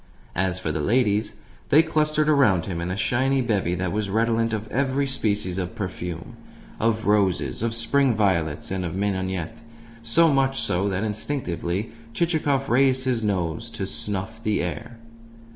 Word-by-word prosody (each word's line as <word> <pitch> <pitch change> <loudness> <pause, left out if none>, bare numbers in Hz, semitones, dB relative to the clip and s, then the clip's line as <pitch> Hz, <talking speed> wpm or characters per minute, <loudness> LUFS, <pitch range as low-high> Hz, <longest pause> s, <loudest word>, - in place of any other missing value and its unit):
As 95 0 0
for 85 -4 -3
the 75 - -2
ladies, 105 - +1 0.3
they 155 +3 +6
clustered 155 -1 +1
around 130 - +4
him 85 -3 -4
in 85 - -3
a 90 - -2
shining 130 +4 +1
bevy 95 -6 0
that 90 0 -2
was 105 -1 -2
redolent 115 +2 +1
of 110 0 -3
every 135 +1 0
species 105 -8 -1
of 90 +4 -4
perfume 90 -5 -5 0.4
of 110 0 +1
roses, 100 -3 +1
of 115 0 0
spring 125 +2 +2
violets, 85 -9 0
and 95 -1 -2
of 85 0 -4
mignonette; 95 -3 -2 0.4
so 150 +8 +4
much 135 -1 +1
so 100 -4 0
that 95 +1 -1
instinctively 105 - -2 0.2
Chichikov 150 -5 +1
raised 130 +1 +3
his 125 -3 +1
nose 100 +2 -1
to 95 - -4
snuff 105 +3 -4
the 105 -5 0
air. 110 +8 -5
110 Hz, 160 wpm, -24 LUFS, 95-130 Hz, 0.4 s, they